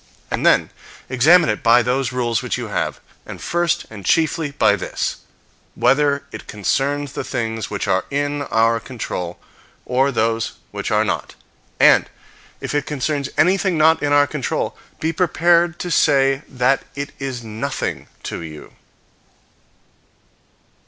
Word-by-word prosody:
And - - -1
then - - +4 0.4
examine 155 +8 +5
it 105 - -1
by 120 +1 +5
those 125 +2 0
rules 120 -2 0
which 125 -1 -2
you 120 -3 -5
have, - - -2 0.2
and - - -9
first, 175 -1 0
and 105 -3 -9
chiefly, 160 - +1
by 140 -7 +3
this: 100 - -3 0.6
whether 140 0 +2
it - - -9
concerns 140 +7 -1
the - - -3
things 115 -3 -3
which 100 - -3
are 95 - +1
in 145 +1 -1
our 115 -4 +2
own 115 - -1
control, 105 -8 -5 0.5
or 130 +2 +2
those 115 -2 0 0.2
which - - -4
are - - +2
not; - - -3 0.4
and, - - +6 0.5
if - - -4
it 145 -1 -1
concerns 140 0 -2
anything 185 +1 +3
not 160 +1 +4
in 145 - 0
our 145 0 +5
control, 145 -4 -3 0.2
be 160 +1 -1
prepared 170 0 +2
to 180 - -4
say 135 -3 +3
that 130 +1 +2
it 140 +1 -4
is 130 -3 -4
nothing 110 0 -4 0.2
to - - -5
you. 75 -2 -10
135 Hz, 145 wpm, -20 LUFS, 115-150 Hz, 0.6 s, and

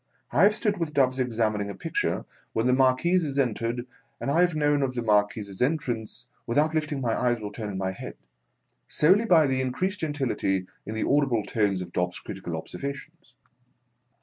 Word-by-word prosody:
I 140 - +3
have 210 +1 +4
stood 215 -3 0
with 160 -3 -3
Dobbs 130 -1 +3
examining 110 -4 0
a 100 - -6
picture, - - -1 0.3
when 115 - 0
the 125 - +4
Marquis 135 +8 +3
has 140 -3 -3
entered, 120 -2 0 0.3
and 140 - -2
I 165 +4 +4
have 175 -2 +3
known 145 -1 +2
of 130 -2 -1
the 120 - -2
Marquis's 105 -2 +1
entrance 120 -5 -1 0.2
without 150 +6 +2
lifting 150 -3 -1
my 115 -3 0
eyes 120 -1 +1
or 105 -1 -6
turning 105 -4 -5
my 95 0 -1
head, 95 - -8 0.7
solely 190 +9 +4
by 170 -7 +6
the 130 -1 +1
increased 185 +11 -1
gentility 135 - -1 0.2
in 110 - -4
the 110 - -1
audible 135 -6 +2
tones 100 -4 0
of 85 - -11
Dobbs's 90 0 -1
critical 95 -4 -6
observations. 140 - -7
130 Hz, 175 wpm, -26 LUFS, 110-150 Hz, 0.7 s, by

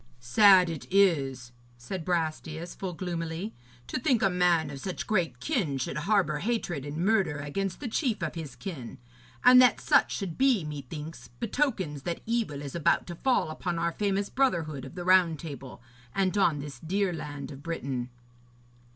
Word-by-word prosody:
'Sad 185 - +6
it 165 -3 -5
is,' 140 -11 +2 0.3
said 165 +9 -6
Brastias 160 -1 -2
full 185 -2 -5
gloomily, 170 +2 -4 0.3
'to 255 - -3
think 255 -3 +2
a 195 - +4
man 175 -4 +2
of 140 - -7
such 185 +5 -4
great 185 -6 0
kin 200 - -1
should 130 - -3
harbour 190 -8 +2
hatred 195 - -2
and 145 +1 -5
murder 195 -8 +2
against 175 +7 -3
the 285 - -4
chief 225 - -1
of 160 - -2
his 160 -6 -7
kin. 150 - -7 0.5
And 250 0 +9
that 250 -3 +5
such - - +3
should 185 -5 -4
be, 260 -8 +4
methinks, 150 -1 -7
betokens 190 - -2
that 170 +4 -4
evil 220 -12 -1
is 140 - -6
about 170 -3 +2
to 175 - -7
fall 245 -5 +1
upon 175 +2 -3
our 170 0 0
famous 200 +2 0
brotherhood 165 - 0
of - - -11
the 175 -1 -5
Round 180 -3 +5
Table, 140 -5 -9 0.3
and 195 0 +1
on 175 -7 +3
this 145 0 -7
dear 190 +3 0
land 150 -2 -6
of 135 0 -10
Britain.' 135 -6 -4
170 Hz, 170 wpm, -28 LUFS, 145-195 Hz, 0.5 s, And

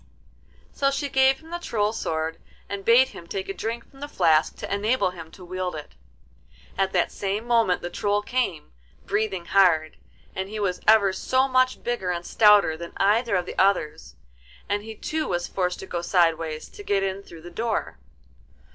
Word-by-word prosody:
So 275 - +2
she 275 +1 -2
gave 265 +1 +3
him 325 +1 -15
the 345 - -3
Troll's 220 -8 -1
sword, 160 0 -2 0.3
and 200 -1 -5
bade 240 +5 +5
him 170 - -12
take 190 +2 -4
a - - -2
drink 230 +4 -5
from 270 - -19
the 290 - -5
flask 160 - +2
to - - -5
enable 210 0 +1
him 165 -3 -10
to 180 +2 -13
wield 185 -1 -4
it. 150 -1 -8 0.8
At 190 0 0
that 180 - +1
same 200 +3 -3
moment 230 -6 +2
the 175 - -3
Troll 205 +2 0
came, 225 - -2 0.3
breathing 200 -4 -1
hard, 170 -6 +3 0.4
and 190 +1 -3
he 215 +1 -5
was 185 -3 -1
ever 210 -3 +5
so 260 +7 +1
much 255 -1 +2
bigger 240 -7 -2
and 175 -1 -3
stouter 210 -7 +5
than 170 +1 -8
either 210 +2 +2
of 180 -1 0
the - - -6
others, 150 - +1 0.5
and 205 0 -1
he 220 +1 -9
too 310 +7 -3
was 175 -1 -2
forced 180 -1 -1
to - - -7
go 175 -2 -4
sideways 165 -3 +1
to - - -12
get 200 - 0
in 195 0 -2
through 165 -4 -13
the 175 - -10
door. 225 +4 -3
195 Hz, 190 wpm, -25 LUFS, 175-230 Hz, 0.8 s, bade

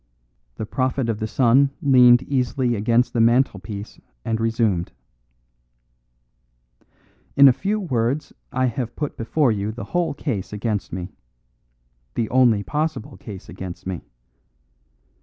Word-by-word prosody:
The 110 - -4
prophet 130 +1 -1
of 110 -2 -2
the 110 - -2
sun 130 +4 +4
leaned 125 -2 +6
easily 130 -2 0
against 115 +3 +1
the 120 - +2
mantelpiece 110 -4 0 0.3
and 115 0 -1
resumed: 115 -6 0 2.4
"In 140 0 +8
a 130 - +7
few 205 - -1
words 135 - -1 0.2
I 130 +1 +1
have 120 -1 -3
put 150 -2 -4
before 120 +4 +1
you 105 0 -2
the 115 +2 -7
whole 170 -4 0
case 115 - -3
against 105 -1 -3
me 90 +1 -5 1.0
the 115 - -1
only 120 -5 +4
possible 150 -2 -3
case 100 -4 -10
against 90 -1 -8
me. 95 -3 -4
120 Hz, 125 wpm, -22 LUFS, 105-130 Hz, 2.4 s, In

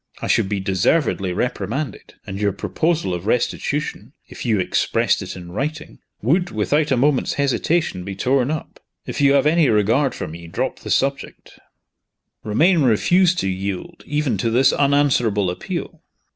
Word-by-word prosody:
I - - -5
should 95 - +2
be 105 -2 -1
deservedly 95 - +1
reprimanded, 115 +5 -3
and 100 0 -6
your 100 -2 +1
proposal 105 - -1
of 90 +3 -5
restitution 125 +1 -2
if - - -7
you 110 -3 +2
expressed 90 - +1
it - - -6
in 90 -1 -10
writing 150 - -4 0.2
would, 175 - +2
without 145 +8 0
a 130 - +2
moment's 135 +1 +2
hesitation, 140 - 0
be 95 +1 -6
torn 130 +5 +1
up. 155 0 -5 0.3
If - - -4
you 140 -1 +5
have 140 0 +3
any 155 -1 +4
regard 115 +6 +2
for - - -5
me, 85 +2 -9
drop 85 - -3
the - - -9
subject." 135 +1 -2 0.8
Romayne 160 - +3
refused 175 - +3
to - - -1
yield, 95 - -4
even 145 -8 -1
to 115 - 0
this 130 +4 +4
unanswerable 130 -9 +2
appeal. 90 - -6
125 Hz, 160 wpm, -21 LUFS, 100-150 Hz, 0.8 s, you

